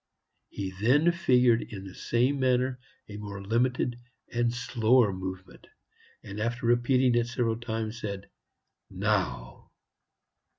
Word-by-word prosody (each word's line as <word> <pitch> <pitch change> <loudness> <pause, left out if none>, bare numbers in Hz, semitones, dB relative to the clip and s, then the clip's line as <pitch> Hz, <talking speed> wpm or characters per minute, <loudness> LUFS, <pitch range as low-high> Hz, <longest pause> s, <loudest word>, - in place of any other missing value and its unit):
He 95 -1 -5
then 145 +9 +4
figured 125 -8 +3
in 100 -2 -8
the 95 - -9
same 125 +7 0
manner 130 0 +1 0.3
a 105 - -8
more 100 -1 -7
limited 120 +4 0 0.3
and 120 0 +1
slower 120 -2 +2
movement, 95 0 -8 0.6
and 100 +1 -7
after 115 +2 -2
repeating 120 +2 +3
it 120 0 +2
several 115 -2 -1
times, 115 0 -4
said, 100 -2 -5 0.6
"Now." - - -2
120 Hz, 120 wpm, -28 LUFS, 105-125 Hz, 0.6 s, then